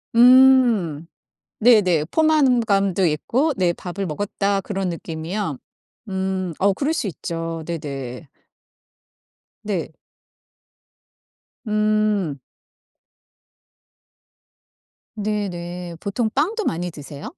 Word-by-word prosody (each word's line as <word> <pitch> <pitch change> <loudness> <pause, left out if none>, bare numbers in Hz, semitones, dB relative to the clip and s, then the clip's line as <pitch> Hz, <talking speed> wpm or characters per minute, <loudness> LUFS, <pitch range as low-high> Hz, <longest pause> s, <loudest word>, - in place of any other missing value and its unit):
음 240 - +5 0.5
네네. 205 -9 +4
포만감도 235 - +2
있고 245 - 0
네 180 -2 +2
밥을 185 +3 -5
먹었다 200 +4 -1
그런 195 -1 -3
느낌이요? 165 -1 -4 0.5
음 190 -2 -2
어 200 +1 +3
그럴 285 +10 -1
수 230 - -2
있죠. 165 -1 -5
네네. 140 -4 -6 1.3
네. - - -3 1.8
음. 210 -7 +1 2.8
네네. 180 -5 -4
보통 220 +4 -1
빵도 400 - 0
많이 175 +2 -2
드세요? 145 -2 -10
190 Hz, 150 characters per minute, -22 LUFS, 165-215 Hz, 2.8 s, 음